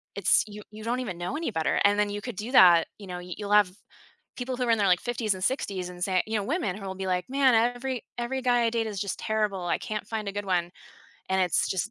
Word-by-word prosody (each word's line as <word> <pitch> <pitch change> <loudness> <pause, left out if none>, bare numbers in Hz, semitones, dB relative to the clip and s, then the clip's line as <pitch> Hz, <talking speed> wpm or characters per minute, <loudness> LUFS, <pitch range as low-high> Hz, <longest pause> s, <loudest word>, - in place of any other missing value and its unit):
It's 200 -3 +4
you 210 0 -9
you 215 0 -10
don't 240 +3 -1
even 190 -9 -4
know 175 +11 -4
any 320 -6 -2
better, 160 -5 0
and 205 +1 +4
then 205 0 +2
you 205 0 -4
could 245 -3 -6
do 215 +6 -5
that 175 -9 +7
you 200 - -11
know, 180 -1 -5
you'll 180 +3 -6
have 205 -3 +5 0.7
people 250 0 -3
who 255 - -3
are 235 - 0
in 225 - +4
their 200 - +2
like, 180 -1 +4
50s 230 -4 -1
and 185 - -8
60s 195 -7 -1
and 180 0 -9
say 185 -1 +2
you 220 +1 -1
know, 205 - -1
women 275 - -1
who 200 -1 -8
will 190 - -4
be 190 0 -5
like, 180 -1 -1
"Man, 270 -2 +4
every 245 +2 0
every 255 +2 -2
guy 245 -1 +3
I 230 - +2
date 230 -1 -1
is 205 -3 -4
just 200 -1 -3
terrible, 210 -4 -1
I - - +1
can't 215 -1 -5
find 215 -2 -4
a - - -4
good 205 +1 -4
one." 175 -2 0 0.6
And 190 0 +1
it's 180 -2 +2
just 195 +4 -1
205 Hz, 270 wpm, -27 LUFS, 185-235 Hz, 0.7 s, that